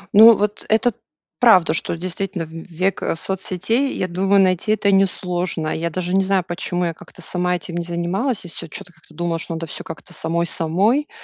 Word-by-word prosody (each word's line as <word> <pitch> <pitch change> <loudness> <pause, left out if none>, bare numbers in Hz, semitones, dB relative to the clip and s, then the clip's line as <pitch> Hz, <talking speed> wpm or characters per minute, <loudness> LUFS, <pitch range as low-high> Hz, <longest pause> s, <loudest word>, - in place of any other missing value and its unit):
Ну, 220 +1 +9
вот, 210 +1 -1
это 225 +1 +3 0.5
правда, 220 -10 +6
что 165 - 0
действительно 185 0 -3
в - - -15
век 170 +3 -3
соцсетей, 195 - -1
я 185 - -1
думаю 190 +3 +2
найти 185 +3 +2
это 200 -2 +2
несложно. 180 -4 0
Я 170 +1 -2
даже 180 +2 -2
не 195 - +4
знаю, 190 -1 +2
почему 175 0 -2
я 165 - -1
как-то 180 - -14
сама 180 +1 0
этим 170 +1 -8
не 170 - -1
занималась, 175 +7 -1
и - - -6
всё 170 0 -5
чё-то 180 +2 -6
как-то 170 - -20
думала, 170 -1 -2
что 165 - -5
надо 165 0 -4
всё 155 - -6
как-то 165 +2 -9
самой-самой, 170 - +1
180 Hz, 185 wpm, -20 LUFS, 170-195 Hz, 0.5 s, Ну